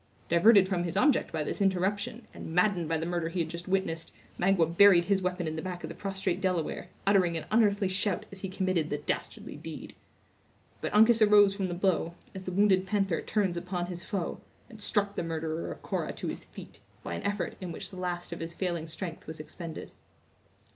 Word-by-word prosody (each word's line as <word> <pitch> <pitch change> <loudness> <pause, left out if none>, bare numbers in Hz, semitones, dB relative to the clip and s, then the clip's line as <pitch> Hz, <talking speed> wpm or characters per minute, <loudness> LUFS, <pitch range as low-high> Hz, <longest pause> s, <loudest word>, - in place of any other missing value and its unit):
Diverted 195 +3 +6
from 180 -3 0
his 175 +1 -3
object 280 +5 +3
by 155 -2 -1
this 175 - -3
interruption, 200 +5 0
and 160 - -7
maddened 180 -3 +2
by 165 - +1
the 160 - -3
murder 170 -1 -1
he 175 +2 -3
had 160 - -2
just 170 +2 -7
witnessed, 185 -4 -1 0.3
Magua 180 -2 +4
buried 185 -3 +7
his 195 0 +2
weapon 180 -1 -1
in 155 - -3
the 160 - -3
back 180 -1 -5
of - - -4
the 165 - -7
prostrate 190 -1 -2
Delaware, 180 -1 -1 0.2
uttering 185 -4 +3
an 160 - -5
unearthly 205 -3 +3
shout 190 +2 -1
as 195 -1 -10
he 195 - -3
committed 185 -4 0
the 145 - -1
dastardly 150 - -4
deed. - - -8 0.9
But - - -2
Uncas 220 +1 +6
arose 205 -2 +7
from 195 -1 -2
the 175 - -3
blow, 175 -2 0 0.2
as 190 -1 -8
the 185 - -3
wounded 190 0 +3
panther 195 -4 +1
turns 200 -5 0
upon 180 0 -3
his 175 0 -6
foe, 195 -6 -3 0.3
and 220 -2 -11
struck 205 -1 +1
the - - -1
murderer 160 -1 -3
of - - -9
Cora - - -2
to - - -5
his - - -6
feet, - - -12 0.2
by - - -4
an 85 - -4
effort 205 -1 -2
in 180 -2 -4
which 165 - -7
the 185 - -9
last 175 -1 -3
of - - -7
his 165 +1 -5
failing 175 -4 -2
strength 165 +1 -6
was 160 0 -6
expended. 160 +1 -7
185 Hz, 210 wpm, -29 LUFS, 170-200 Hz, 0.9 s, buried